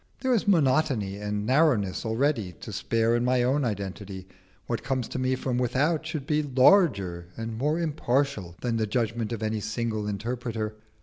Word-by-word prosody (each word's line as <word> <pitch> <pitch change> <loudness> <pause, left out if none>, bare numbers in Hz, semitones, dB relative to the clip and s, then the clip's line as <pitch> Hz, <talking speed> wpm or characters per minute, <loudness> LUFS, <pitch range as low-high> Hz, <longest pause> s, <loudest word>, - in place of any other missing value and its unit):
There 260 -1 +2
is 220 -3 +1
monotony 135 - +2
and 105 0 -3
narrowness 125 - +2
already 110 -5 0
to - - -7
spare 115 +1 +1
in 120 - +1
my 125 0 +2
own 135 +4 +2
identity; 100 -3 -4 0.4
what 115 -2 -2
comes 130 -1 -2
to - - -4
me 130 0 +1
from 125 -1 -2
without 145 +6 +1
should 155 -4 -4
be 150 +1 +1
larger 125 - +3
and 115 0 -4
more 150 +8 0
impartial 140 - -1
than 120 -2 0
the 110 -1 0
judgment 115 0 -1
of 115 -2 -3
any 110 0 -1
single 110 0 -2
interpreter. 110 +1 -3
120 Hz, 170 wpm, -27 LUFS, 105-140 Hz, 0.4 s, larger